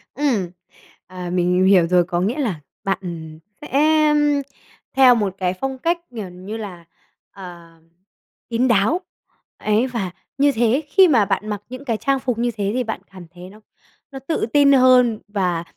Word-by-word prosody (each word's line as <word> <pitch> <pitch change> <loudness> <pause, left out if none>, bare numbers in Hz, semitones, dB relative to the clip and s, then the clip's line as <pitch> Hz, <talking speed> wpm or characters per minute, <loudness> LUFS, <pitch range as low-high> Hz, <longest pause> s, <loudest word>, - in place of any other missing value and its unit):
Ừm, 240 -11 0 0.6
à, 180 -1 -7
mình 180 0 +1
mình 190 - +3
hiểu 185 -3 +5
rồi, 175 0 +3
có 175 0 -2
nghĩa 225 +10 -1
là 205 - -2 0.2
bạn 195 -1 0 0.6
sẽ, 295 - -9 0.4
ưm, 295 -1 +2 0.5
theo 255 -2 +7
một 205 -5 -1
cái 185 -1 -1
phong 265 +7 -4
cách, 340 +5 0 0.2
kiểu 200 -4 -5
như 185 +5 -8
là, 185 -6 -8 0.5
ờ, 175 -3 -12 0.8
kín 240 +2 +1
đáo, 235 - +2 0.6
ấy, 215 +4 +1
và 225 -8 -4 0.3
như 285 +1 +4
thế 240 +4 +1
khi 380 +3 +5
mà 235 -9 +3
bạn 210 +2 -2
mặc 205 -1 -4
những 255 +3 -9
cái 230 -4 -1
trang 275 +4 0
phục 250 -3 -2
như 240 0 0
thế 200 -1 -2
thì 255 - 0
bạn 225 -1 -5
cảm 185 -2 -12
thấy 180 0 -12
nó 210 +2 -16 0.5
nó 270 - -7
tự 270 +1 -2
tin 285 -1 +5
hơn 255 -4 +5
và 180 -5 -1
220 Hz, 180 wpm, -20 LUFS, 185-260 Hz, 0.8 s, theo